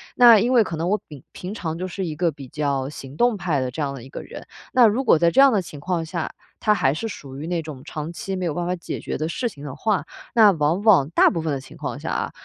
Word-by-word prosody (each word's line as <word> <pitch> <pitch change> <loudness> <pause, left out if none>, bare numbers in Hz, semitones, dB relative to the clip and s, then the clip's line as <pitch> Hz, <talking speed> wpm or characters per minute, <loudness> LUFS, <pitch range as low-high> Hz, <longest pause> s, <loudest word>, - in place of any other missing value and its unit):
那 235 -3 +8
因 240 +5 +1
为 240 -3 +6
可 170 - -5
能 165 +3 -2
我 210 +2 +1
平 145 -4 -12
平 185 +3 -7
常 165 -6 -4
就 185 +2 -3
是 185 +1 -4
一 160 -3 -4
个 170 +1 +1
比 140 -2 -11
较 140 -2 -1
行 135 -2 -10
动 240 +3 +2
派 170 -7 0
的 130 - -1
这 155 - -5
样 140 -1 -1
的 130 -4 -9
一 130 - -12
个 - - -7
人。 - - -10 0.3
那 250 -2 +7
如 225 +6 +1
果 230 - +5
在 170 - +4
这 265 - +2
样 275 -2 +7
的 205 - +2
情 155 -4 -10
况 170 +2 -2
下， 165 0 -4 0.3
它 215 - +3
还 135 -9 +2
是 225 +9 -3
属 135 -8 -9
于 145 - -6
那 175 -1 -1
种 150 -4 -9
长 155 +1 -5
期 190 +3 -4
没 185 - -2
有 165 - -1
办 175 +2 -2
法 180 - 0
解 175 - -6
决 - - -4
的 155 - -2
事 245 +8 -2
情 145 -9 -13
的 135 -2 -6
话， 210 +6 0 0.3
那 220 -3 +7
往 160 +2 0
往， 185 -11 +5
大 165 - +5
部 165 - -2
分 160 -1 -2
的 135 - -2
情 135 - -14
况 - - -5
下 - - -5
啊， - - -2
170 Hz, 320 characters per minute, -23 LUFS, 145-200 Hz, 0.3 s, 那